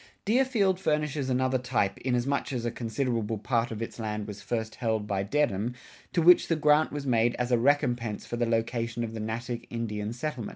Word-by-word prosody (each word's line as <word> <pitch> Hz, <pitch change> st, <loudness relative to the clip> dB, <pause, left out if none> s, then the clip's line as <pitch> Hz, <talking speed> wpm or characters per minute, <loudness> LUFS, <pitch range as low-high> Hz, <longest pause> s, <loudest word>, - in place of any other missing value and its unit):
Deerfield 220 Hz, -5 st, +2 dB
furnishes 150 Hz, -4 st, 0 dB
another 130 Hz, 0 st, +1 dB
type, 120 Hz, -6 st, 0 dB
inasmuch 130 Hz, +3 st, 0 dB
as 120 Hz, -3 st, -2 dB
a 120 Hz, -, 0 dB
considerable 115 Hz, -2 st, -2 dB
part 115 Hz, +2 st, 0 dB
of 115 Hz, 0 st, -4 dB
its 115 Hz, -, -8 dB
land 105 Hz, -1 st, -3 dB
was 105 Hz, -1 st, -8 dB
first 110 Hz, -2 st, -3 dB
held 110 Hz, -3 st, -1 dB
by 100 Hz, -2 st, -1 dB
Dedham, 120 Hz, -1 st, 0 dB, 0.4 s
to 170 Hz, -, +1 dB
which 175 Hz, +1 st, +7 dB
the 165 Hz, -, +2 dB
grant 150 Hz, 0 st, +4 dB
was 145 Hz, -1 st, -4 dB
made 120 Hz, -2 st, +2 dB
as 125 Hz, 0 st, -2 dB
a 120 Hz, -, +5 dB
recompense 120 Hz, -5 st, +1 dB
for -, -, -4 dB
the 120 Hz, 0 st, 0 dB
location 115 Hz, +1 st, -1 dB
of 115 Hz, -1 st, -4 dB
the 110 Hz, -, -5 dB
Natick 115 Hz, +2 st, -4 dB
Indian 105 Hz, -3 st, -3 dB
reservation. 120 Hz, 0 st, -4 dB
120 Hz, 195 wpm, -28 LUFS, 110-140 Hz, 0.4 s, which